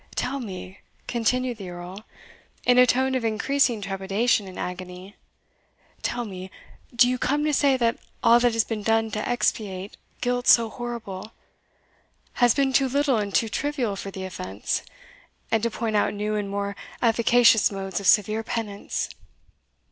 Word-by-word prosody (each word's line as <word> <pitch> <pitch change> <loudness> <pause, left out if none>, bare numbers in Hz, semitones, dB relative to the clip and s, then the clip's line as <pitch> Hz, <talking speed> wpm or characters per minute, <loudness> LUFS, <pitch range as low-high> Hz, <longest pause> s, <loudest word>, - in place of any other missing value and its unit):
"Tell 275 +2 -2
me," 190 -5 -8 0.3
continued 245 +1 0
the 190 -2 -7
Earl, 180 +4 -9 0.6
in 250 0 +5
a 250 - +7
tone 260 +1 +2
of 255 -2 0
increasing 230 +1 +1
trepidation 195 +3 0
and 185 - -10
agony 180 +2 -7 0.9
"tell 240 0 -2
me, 185 -2 -8 0.5
do 245 +1 +6
you 250 0 -1
come 295 +2 0
to 305 - +1
say 275 -2 +3
that 235 -2 +1 0.2
all 235 +1 +6
that 240 -1 +2
has 230 -1 +3
been 220 -1 -4
done 225 +1 +1
to 210 +1 -3
expiate 205 -5 -1 0.2
guilt 245 0 -1
so 230 -2 +6
horrible, 230 -4 -6 1.1
has 245 -2 +5
been 275 -2 +1
too 265 +1 +3
little 280 -1 +2
and 200 -2 -3
too 225 - +3
trivial 255 -2 -2
for 195 - -6
the 190 -1 -7
offence, 100 - -3 0.7
and 225 -1 +2
to 235 - +1
point 225 -1 -3
out 205 - +1
new 210 +1 -2
and 205 -1 -2
more 200 0 -3 0.3
efficacious 230 -1 +5
modes 195 -2 -4
of 200 - -3
severe 215 +3 +4
penance? 215 -3 -3
225 Hz, 160 wpm, -25 LUFS, 200-245 Hz, 1.1 s, a